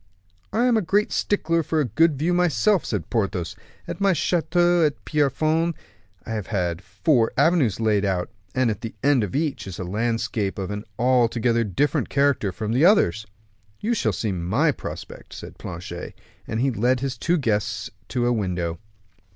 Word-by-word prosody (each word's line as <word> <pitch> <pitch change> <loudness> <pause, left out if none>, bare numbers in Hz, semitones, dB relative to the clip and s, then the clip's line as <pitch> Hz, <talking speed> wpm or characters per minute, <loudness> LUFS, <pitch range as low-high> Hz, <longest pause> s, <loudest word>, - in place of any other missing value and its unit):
"I 235 +3 +2
am 245 -2 +4
a - - +2
great 205 +4 +1
stickler 165 -5 +1
for 160 +1 -1
a 150 - +2
good 150 +6 +2
view 165 +5 +1
myself," 180 +3 +2
said 105 -6 -3
Porthos. 95 -7 -1 0.3
"At - - -6
my 200 -1 +4
Chateau 175 0 +2
de 145 - -13
Pierrefonds, 155 +3 +1 0.5
I - - -6
have 105 -4 -3
had 90 -4 -1
four 110 - +1
avenues 150 - +3
laid 105 -3 +2
out, 95 -3 -1 0.2
and 130 -3 +2
at 105 - -6
the 115 - -6
end 140 -4 +4
of 105 - -4
each 150 -7 -1
is 95 - -6
a - - -4
landscape 110 +1 -1
of 95 0 -4
an 105 +1 -5
altogether 120 -1 +2
different 110 +8 0
character 140 -8 +2
from 105 +4 -4
the 130 +6 +2
others." 110 - +4 0.5
"You 225 +3 0
shall 120 - +1
see 100 +3 -2
my 95 - +1
prospect," - - -8
said - - -10
Planchet; 85 +1 -7 0.3
and 110 - -2
he 135 +1 +2
led 125 +3 +1
his 135 -1 -2
two 175 +1 +1
guests 105 -5 -1 0.2
to 125 -2 -1
a 120 - +3
window. 90 -6 -2
120 Hz, 175 wpm, -24 LUFS, 105-155 Hz, 0.5 s, am